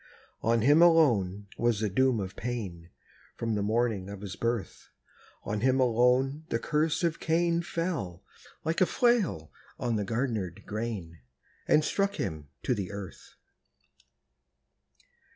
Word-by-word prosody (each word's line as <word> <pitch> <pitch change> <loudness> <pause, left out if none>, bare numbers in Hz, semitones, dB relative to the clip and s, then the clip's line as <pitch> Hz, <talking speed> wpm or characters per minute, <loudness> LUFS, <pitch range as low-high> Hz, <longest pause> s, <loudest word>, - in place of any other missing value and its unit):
On 115 0 +2
him 145 +7 +5
alone 115 - +4
was 120 -3 +2
the 110 - 0
doom 130 +4 +2
of 95 0 -5
pain, 100 -9 -5 0.5
From 115 -1 -2
the 105 - 0
morning 110 -2 0
of 100 -1 -8
his 100 -3 -6
birth; 115 -4 -3 0.5
On 105 0 -3
him 130 +2 +3
alone 125 +4 +3
the - - +1
curse 155 +6 0
of 170 -2 0
Cain 170 +1 +1
Fell, 165 - -3 0.4
like 160 +3 -1
a 185 - +5
flail 215 - +1 0.3
on 120 -3 -1
the 105 - -1
garnered 110 - -2
grain, 105 -7 -5 0.5
And 150 0 +4
struck 200 +3 0
him 80 -6 -4
to 125 - +1
the 100 -6 -3
earth! 100 -5 -9
115 Hz, 135 wpm, -29 LUFS, 100-150 Hz, 0.5 s, him